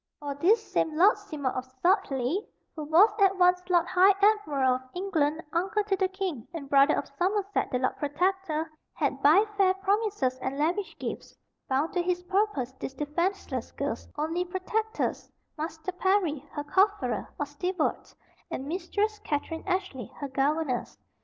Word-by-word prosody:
For 290 -2 -4
this 405 +10 +2
same 310 -1 0
Lord 390 +6 +6
Seymour 305 -10 -3
of 255 - -3 0.2
Sudleye, 345 - +1 0.3
who 305 -2 -5
was 345 +8 +6
at 390 -1 +4
once 360 0 +4
Lord 345 -2 +4
High 375 +2 +5
Admiral 350 -12 +3
of - - -14
England, 325 -4 0
uncle 385 +5 +1
to 405 -1 0
the 380 0 +1
king, 375 - -4
and 290 -4 -6
brother 275 +2 +5
of - - -2
Somerset 400 +2 0
the 250 - 0
Lord 255 +1 0
Protector, 320 +1 -1 0.2
had 275 -2 -1
by 325 +10 +6
fair 375 -2 +4
promises 390 - 0
and 260 +2 -3
lavish 350 +7 -1
gifts - - -6 0.3
bound 275 +5 0
to 355 - +1
his 355 0 -1
purpose 380 - 0
this 270 - -6
defenceless 340 +7 -2
girl's - - -3
only 325 +4 -1
protectors, 375 +5 -2 0.3
Master 320 +2 -4
Parry, 360 -6 0
her 290 - -3
cofferer, 335 - +1
or 290 - -1
steward, 325 +4 -2 0.4
and 265 - -4
Mistress 390 +6 -1
Katherine 320 +4 -3
Ashley, 370 - -2
her 280 - -5
governess. 275 -1 -1
345 Hz, 155 wpm, -28 LUFS, 290-385 Hz, 0.4 s, Lord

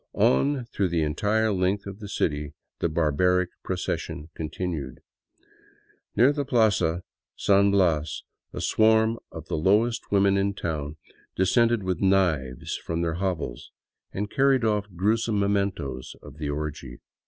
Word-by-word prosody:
On 130 - +2
through 100 -4 -1
the 85 -2 0
entire 105 +8 +1
length 95 +2 0
of 100 +1 -8
the 105 -2 -8
city 75 -5 -2 0.2
the 85 - 0
barbaric 85 +3 +2
procession 75 +3 -4
continued. 80 -4 -5 1.1
Near 125 +6 +5
the 145 -1 -1
Plaza 105 -10 +2 0.3
San 100 0 +4
Bias 85 -6 +1 0.3
a - - -6
swarm 110 +1 +3
of - - -9
the - - -2
lowest 105 +8 +2
women 100 -1 +3
in 100 0 0
town 75 -4 -4 0.4
descended 115 +3 +3
with 95 -2 -2
knives 85 -10 +1
from 85 0 -3
their 85 0 -2
hovels 85 -11 -3 0.4
and 105 +2 -3
carried 135 -2 +3
ofif 105 -4 -1
gruesome 110 +4 +1
mementoes 100 -11 -1
of 75 +1 -12
the 75 -1 -3
orgy. 75 -4 -5
95 Hz, 135 wpm, -26 LUFS, 80-105 Hz, 1.1 s, Near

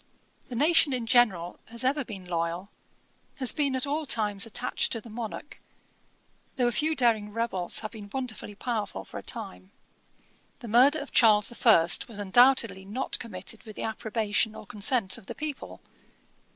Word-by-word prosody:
The 245 - -6
nation 300 +1 +4
in 245 -2 -2
general 220 -8 +2
has 235 +2 -3
ever 275 +3 +1
been 200 -6 -9
loyal, 170 +2 -3 0.6
has 260 -3 0
been 280 -3 +1
at 260 - -1
all 295 +2 -2
times 210 -3 +1
attached 240 +3 -1
to 230 - -3
the 225 +1 -13
monarch, 230 +5 -7 0.9
though 250 - +1
a - - +1
few 310 +5 +1
daring 225 -6 +2
rebels 205 -6 -2
have 215 - -6
been 210 -3 -10
wonderfully 220 -5 -5
powerful 210 - -4
for - - -8
a - - -9
time. 90 +1 -7 0.9
The 235 - -10
murder 255 +7 +5
of 285 -2 -7
Charles 210 -3 +5
the - - -10
First 215 -8 +3
was 225 -4 -8
undoubtedly 210 -1 +4
not 215 +7 -3
committed 215 -1 -3
with 215 -2 -12
the - - -5
approbation 220 -1 -1
or - - -10
consent 205 -1 0
of - - -20
the - - -6
people. 305 -2 -6
225 Hz, 170 wpm, -27 LUFS, 205-255 Hz, 0.9 s, murder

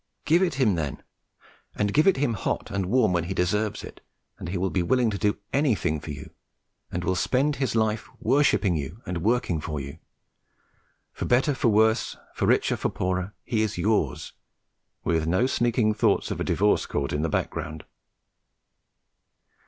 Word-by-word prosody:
Give 170 +3 +4
it 175 -6 +1
him, 130 -7 +3
then, 80 -5 -3 0.7
and 105 -1 0
give 155 +4 +4
it 195 - +5
him 130 -4 +1
hot 105 - -3
and 100 -2 -1
warm 110 -3 +3
when 85 -1 0
he 95 +2 -4
deserves 105 +4 0
it, - - -11 0.4
and 90 -4 -6
he 95 - -2
will 95 +1 -1
be 95 - +1
willing 120 +5 +2
to 100 - -3
do 105 -1 +1 0.2
anything 115 - +1
for 75 - -10
you 75 0 -7 0.6
and 90 - -3
will 95 - +1
spend 135 +10 +1
his 130 -3 -1
life 110 0 0
worshipping 120 - +2
you 80 +7 -5
and 90 -2 -3
working 110 -7 +1
for 75 -1 -4
you; 70 +3 -8 1.1
for - - -4
better, 130 +4 +3
for 130 - 0
worse, 110 +1 +2 0.2
for - - -1
richer, - - +2
for - - -1
poorer, 95 +2 -2
he 110 -2 0
is 110 -4 -1
yours, 105 +5 0 0.7
with 80 -1 0
no 90 +9 +2
sneaking 120 -4 +1
thoughts 105 - +1
of - - -3
a - - +1
divorce 105 +2 +2
court 70 -1 -2
in 75 - 0
the 80 - 0
background. 75 +1 -3
105 Hz, 175 wpm, -26 LUFS, 85-120 Hz, 1.1 s, it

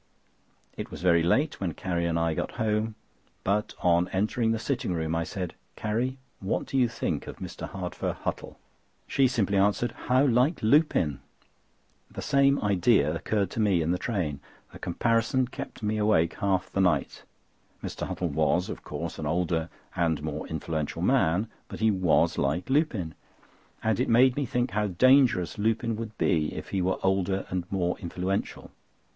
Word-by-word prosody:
It - - -5
was - - -9
very 85 -2 +5
late 130 - +1
when 85 -5 -2
Carrie 85 -3 -1
and 85 -1 0
I 85 -1 +1
got - - -3
home; 110 -1 -1 0.5
but 105 +2 0
on 85 0 +4
entering 110 +5 0
the 115 - +1
sitting 115 -5 -2
room 80 -1 -1
I 85 0 0
said: 90 -1 -5 0.2
"Carrie, 120 +5 -1 0.2
what 95 - -1
do - - -7
you 125 -3 +4
think 115 - -3
of - - -7
Mr. - - -7
Hardfur - - -4
Huttle?" - - -4 0.5
She 135 -1 +3
simply 100 -5 +1
answered: 100 +4 +2 0.2
"How 130 +3 +4
like 125 +4 +2
Lupin!" 110 - +3 0.9
The - - -7
same 140 0 +3
idea 95 -5 +3
occurred 100 +4 -1
to - - -4
me 100 -6 +3
in 80 - 0
the 90 - 0
train. 85 - -2 0.3
The - - -10
comparison 115 +7 +1
kept 135 -4 -8
me 105 +1 0
awake 95 -6 +3
half 95 -3 0
the 95 - +1
night. 80 -7 +1 0.6
Mr. - - -4
Huttle - - -2
was, - - +1
of - - -6
course, - - -5
an 75 - -3
older 85 0 0 0.3
and 80 -4 0
more 75 0 -4
influential 80 -1 -3
man; 90 +8 +2 0.2
but - - -8
he 110 0 +3
was 95 -4 +2
like 80 - -1
Lupin, 120 - +1 0.7
and 110 -3 +1
it - - +1
made 125 +2 +5
me 140 -2 -1
think 125 +2 0
how 105 0 0
dangerous 115 -2 +4
Lupin 115 +2 +1
would 110 -1 -6
be 75 -2 +1
if - - -7
he 95 - -1
were 95 +1 +1
older 95 0 +1
and 90 -1 -3
more 90 -2 0
influential. 90 +3 -3
100 Hz, 170 wpm, -27 LUFS, 85-115 Hz, 0.9 s, very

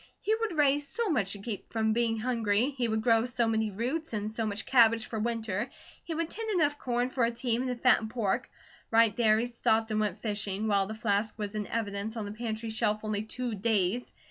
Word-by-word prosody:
He 430 - 0
would 440 -6 -1
raise 290 0 +3
so 460 +9 -1
much 210 -10 +1
to - - -6
keep 205 0 -6
from 220 -1 +1
being 230 -1 +1
hungry, 230 +1 +1
he 255 -3 -1
would 220 -1 -1
grow 230 0 +4
so 240 -1 0
many 220 -1 +1
roots, 250 +10 -3
and 210 0 -2
so 220 0 -2
much 210 +1 -2
cabbage 230 -3 +5
for 220 - -4
winter, 225 -1 -2 0.3
he 330 - -4
would 330 0 -1
tend 450 0 -5
enough 295 -7 +1
corn 245 0 -1
for 255 - 0
a 230 - +3
team 235 0 -1
and 260 - -2
to 250 - -1
fatten 235 -2 +3
pork; 230 +1 -1 0.4
right 225 -2 +4
there 220 -2 +4
he 230 - +1
stopped 225 -2 +1
and 215 - +1
went 210 -1 -2
fishing, 210 -1 -2
while 200 -2 +2
the 220 - -5
flask 215 0 0
was 205 -1 -4
in 210 -2 -3
evidence 215 0 -3
on 215 - -3
the 205 - -5
pantry 220 0 -4
shelf 215 -1 0
only 215 -1 -1
two 240 +2 -3
days. 210 +1 0
225 Hz, 225 wpm, -29 LUFS, 215-245 Hz, 0.4 s, cabbage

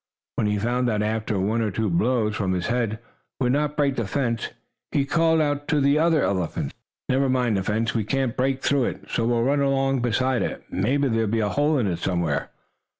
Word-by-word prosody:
When 105 - 0
he 105 0 +1
found 120 +4 0
that 105 -2 0
after 110 -1 -1
one 105 +5 0
or 110 - 0
two 110 +3 -1
blows 105 +4 +1
from 95 -3 -1
his 90 -1 -2
head 115 -2 0 0.4
would 125 -2 +2
not 150 +2 0
break 140 -3 +1
the 115 - -1
fence, 115 0 -1 0.4
he 140 - +1
called 160 +2 +2
out 145 -1 -1
to 150 - +2
the 140 +2 +3
other 165 -2 +3
elephants: 90 -4 -1 0.3
"Never 135 +1 +2
mind 125 -4 +1
the 95 - +1
fence! 110 +4 -1
We 115 - 0
can't 130 +2 -1
break 130 +1 0
through 140 -3 +2
it, - - -6
so 115 - 0
we'll 120 -1 +2
run 140 +3 +2
along 135 -1 +1
beside 125 +1 +1
it. - - -3
Maybe 135 +9 +1
there'll 115 -2 +1
be 115 +2 0
a 105 -2 +1
hole 145 +5 +2
in 125 - +1
it 85 -4 -1
somewhere." 85 -5 -1
120 Hz, 215 wpm, -24 LUFS, 105-135 Hz, 0.4 s, the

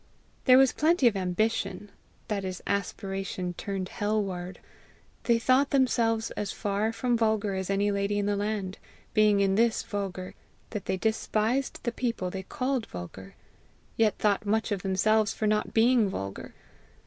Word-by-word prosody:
There 255 -1 +8
was 265 -1 +6
plenty 315 -2 +2
of 225 - +2
ambition, 200 +2 -1 0.4
that 205 -3 -2
is, 185 -1 -4
aspiration 195 -2 -3
turned 190 +1 -4
hell 210 +1 0
ward. 180 -1 -5 0.7
They 235 -1 +4
thought 260 +4 +3
themselves 230 -4 +2
as 205 - -3
far 210 +1 -1
from 240 +1 0
vulgar 220 -3 +1
as 190 0 -3
any 200 +1 +1
lady 200 +1 0
in 205 0 0
any 205 - +1
land, 205 -2 -3 0.3
being 210 -1 +4
in 195 -1 +3
this 230 +2 +2
vulgar 190 -3 -4 0.4
that 210 -4 -5
they 190 - -1
despised 220 +4 0
the 235 - 0
people 230 -7 -2
they 190 - -4
called 255 +3 -2
vulgar, 90 +2 -9 0.6
yet 215 -3 +2
thought 205 -1 +1
much 220 +1 0
of 200 -3 -1
themselves 205 +3 +2
for 220 - -2
not 210 0 +1
being 230 -2 +4
vulgar. 100 - -6
210 Hz, 160 wpm, -28 LUFS, 195-225 Hz, 0.7 s, There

